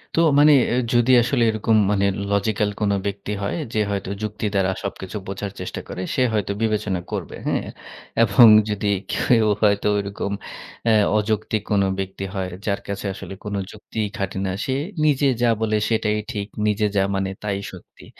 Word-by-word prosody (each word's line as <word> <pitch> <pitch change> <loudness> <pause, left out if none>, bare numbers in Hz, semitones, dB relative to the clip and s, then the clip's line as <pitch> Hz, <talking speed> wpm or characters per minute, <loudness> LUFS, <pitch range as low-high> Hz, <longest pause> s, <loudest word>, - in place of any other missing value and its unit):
তো - - +2 0.2
মানে 150 +1 +7 0.4
যদি 120 +1 +4
আসলে 120 0 +1
এরকম 110 +1 +1 0.2
মানে 100 -1 +2 0.3
লজিক্যাল 105 +1 +1
কোনো 100 -1 +2
ব্যক্তি 100 +1 -4
হয় 100 - -2 0.2
যে, 110 - +1
হয়তো 100 -2 -3
যুক্তি 105 0 -4
দ্বারা 95 -1 +2
সবকিছু 100 0 -5
বোঝার 100 +1 -4
চেষ্টা - - -5
করে, 90 - -6
সে 130 - +3
হয়তো 105 -2 0
বিবেচনা 105 -4 0
করবে, - - -4
হ্যাঁ - - -1 0.6
এবং 110 +2 +7 0.2
যদি 105 0 -2 0.3
কেউ 115 -3 +3
হয়তো 105 -1 +3
ওরকম 100 0 -3 0.5
অ্যা 115 -1 +4 0.2
অযৌক্তিক 110 0 -1
কোন 100 -1 +3 0.2
ব্যক্তি 95 0 -4
হয় 95 -2 -2 0.2
যার 100 -2 0
কাছে 100 +1 -4
আসলে 95 - -8
কোন 105 -1 -4 0.2
যুক্তিই 110 0 -4
খাটে 95 -1 -3
না। 95 - -1
সে 130 - -1 0.3
নিজে 145 -1 +3
যা 120 - +4
বলে 110 -1 +1
সেটাই 110 -2 +1
ঠিক। 100 -3 -4 0.2
নিজে 105 0 +1
যা 100 - +3
মানে 95 0 -1
তাই 100 -2 -1
শক্তি। 90 - -14
105 Hz, 170 wpm, -22 LUFS, 100-110 Hz, 0.6 s, মানে